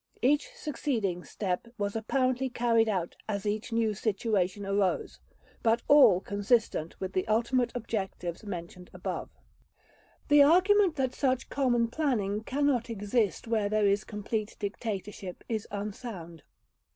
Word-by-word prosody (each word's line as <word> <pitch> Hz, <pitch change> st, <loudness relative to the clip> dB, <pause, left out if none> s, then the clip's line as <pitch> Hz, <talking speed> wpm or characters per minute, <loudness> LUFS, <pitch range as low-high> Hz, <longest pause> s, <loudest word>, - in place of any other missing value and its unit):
Each 290 Hz, -, +3 dB
succeeding 235 Hz, -, -2 dB
step 190 Hz, +1 st, -3 dB
was 205 Hz, 0 st, -2 dB
apparently 255 Hz, +3 st, 0 dB
carried 230 Hz, -2 st, +2 dB
out 185 Hz, -5 st, -2 dB
as 200 Hz, -1 st, -2 dB
each 215 Hz, +3 st, -2 dB
new 225 Hz, -1 st, +1 dB
situation 200 Hz, -2 st, -1 dB
arose, 195 Hz, -1 st, 0 dB, 0.4 s
but 230 Hz, +1 st, +2 dB
all 255 Hz, -11 st, +7 dB
consistent 205 Hz, -4 st, 0 dB
with 190 Hz, 0 st, -4 dB
the 185 Hz, +3 st, 0 dB
ultimate 235 Hz, +3 st, +1 dB
objectives 195 Hz, -7 st, -4 dB
mentioned 180 Hz, -2 st, -7 dB
above." -, -, -4 dB, 1.0 s
The 290 Hz, -1 st, +7 dB
argument 370 Hz, +4 st, +5 dB
that 260 Hz, -2 st, 0 dB
such 260 Hz, -2 st, 0 dB
common 245 Hz, -4 st, +2 dB
planning 225 Hz, -8 st, 0 dB
cannot 265 Hz, -2 st, 0 dB
exist 210 Hz, 0 st, -1 dB
where 220 Hz, -3 st, +1 dB
there 215 Hz, 0 st, +2 dB
is 200 Hz, +1 st, +2 dB
complete 210 Hz, 0 st, -4 dB
dictatorship 200 Hz, -3 st, -5 dB
is 220 Hz, -3 st, -3 dB
unsound. 200 Hz, -, -6 dB
220 Hz, 125 wpm, -29 LUFS, 200-250 Hz, 1.0 s, all